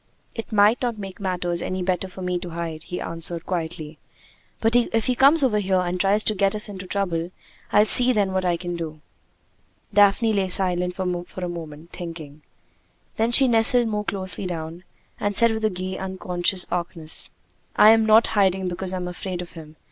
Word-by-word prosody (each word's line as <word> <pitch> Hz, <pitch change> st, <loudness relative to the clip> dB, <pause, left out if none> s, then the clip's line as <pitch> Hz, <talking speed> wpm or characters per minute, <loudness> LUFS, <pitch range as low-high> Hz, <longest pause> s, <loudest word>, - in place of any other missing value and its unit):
"It 225 Hz, -, -7 dB
might 210 Hz, +2 st, +3 dB
not 240 Hz, -3 st, -2 dB
make 195 Hz, -2 st, -9 dB
matters 180 Hz, -3 st, -2 dB
any 185 Hz, 0 st, -3 dB
better 185 Hz, +1 st, -2 dB
for 185 Hz, 0 st, -10 dB
me 180 Hz, -1 st, -2 dB
to 175 Hz, -, -8 dB
hide," 165 Hz, -2 st, -6 dB
he 180 Hz, -, -6 dB
answered 165 Hz, 0 st, -4 dB
quietly. 160 Hz, -3 st, -5 dB, 0.6 s
"But 225 Hz, +1 st, +1 dB
if 230 Hz, -2 st, +1 dB
he 255 Hz, -, +1 dB
comes 280 Hz, +5 st, +5 dB
over 220 Hz, -5 st, +2 dB
here 190 Hz, -2 st, 0 dB
and 180 Hz, 0 st, -2 dB
tries 200 Hz, +3 st, +2 dB
to 215 Hz, -, 0 dB
get 195 Hz, 0 st, 0 dB
us 210 Hz, -, +2 dB
into 190 Hz, -3 st, -9 dB
trouble, 175 Hz, -4 st, -2 dB, 0.4 s
I'll 210 Hz, +1 st, +4 dB
see 250 Hz, +3 st, +6 dB
then 200 Hz, -5 st, 0 dB
what 190 Hz, 0 st, -1 dB
I 175 Hz, -2 st, 0 dB
can 175 Hz, 0 st, -5 dB
do." 160 Hz, -2 st, -6 dB, 0.9 s
Daphne 205 Hz, +2 st, +3 dB
lay 195 Hz, -2 st, 0 dB
silent 180 Hz, -1 st, 0 dB
for 180 Hz, 0 st, -5 dB
a -, -, -4 dB
moment, 165 Hz, -1 st, -9 dB
thinking. 160 Hz, -4 st, -9 dB, 0.8 s
Then 225 Hz, +2 st, +1 dB
she 265 Hz, +2 st, +6 dB
nestled 235 Hz, 0 st, +4 dB
more 210 Hz, -1 st, -2 dB
closely 190 Hz, -2 st, -3 dB
down, 165 Hz, +1 st, -7 dB, 0.3 s
and 205 Hz, 0 st, -2 dB
said 230 Hz, +2 st, +4 dB
with 220 Hz, -1 st, -1 dB
gay, 185 Hz, +1 st, -5 dB
unconscious 185 Hz, -1 st, -1 dB
archness: 170 Hz, -2 st, +3 dB, 0.5 s
"I'm 220 Hz, +1 st, +6 dB
not 220 Hz, +1 st, +5 dB
hiding 190 Hz, -2 st, +1 dB
because 185 Hz, +1 st, -3 dB
I'm 180 Hz, -1 st, -4 dB
afraid 180 Hz, 0 st, -6 dB
of 175 Hz, -1 st, -8 dB
him. 160 Hz, -2 st, -12 dB
185 Hz, 185 wpm, -23 LUFS, 175-210 Hz, 0.9 s, see